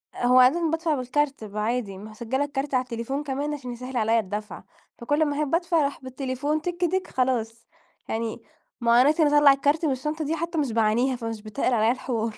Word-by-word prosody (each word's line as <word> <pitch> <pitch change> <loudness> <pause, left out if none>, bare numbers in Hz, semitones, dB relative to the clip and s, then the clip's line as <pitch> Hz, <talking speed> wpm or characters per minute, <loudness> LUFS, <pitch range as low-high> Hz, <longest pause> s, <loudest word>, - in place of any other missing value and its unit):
هو 250 +1 +4
عادةً 320 +7 +4
بادفع 325 -1 0
بالكارت 275 0 -1
بيبقى 210 0 -5
عادي 220 -4 -2
مسجلة 225 +6 -3
الكارت 280 0 -4
على 255 - +2
التليفون 255 +4 -4
كمان 290 +2 -3
عشان 255 -4 -6
يسهل 250 +2 -6
عليا 225 0 +3
الدفع، 210 +1 -5 0.3
فكل 290 +6 +1
ما 290 -1 -2
أحب 300 0 +1
أدفع 340 -1 +1
أروح 280 -2 -2
بالتليفون 270 +3 -2
تيك 350 +2 -5
تيك 370 +2 0
خلاص 235 -3 -1 0.4
يعني 225 0 -3 0.4
ما 235 - +2
هو 245 - +7
أنا 280 - +5
عشان 310 0 +3
اطلّع 290 -1 +6
الكارت 290 +4 +1
من 295 - +2
الشنطة 300 +4 -3
دي 315 +3 -1
حتى 335 +1 -4
مش 280 -5 0
باعانيها 230 +4 +2
فمش 225 -2 -5
بتّقل 220 +4 -1
عليا 220 0 +3
الحوار. 230 -3 -3
260 Hz, 200 wpm, -25 LUFS, 230-295 Hz, 0.4 s, هو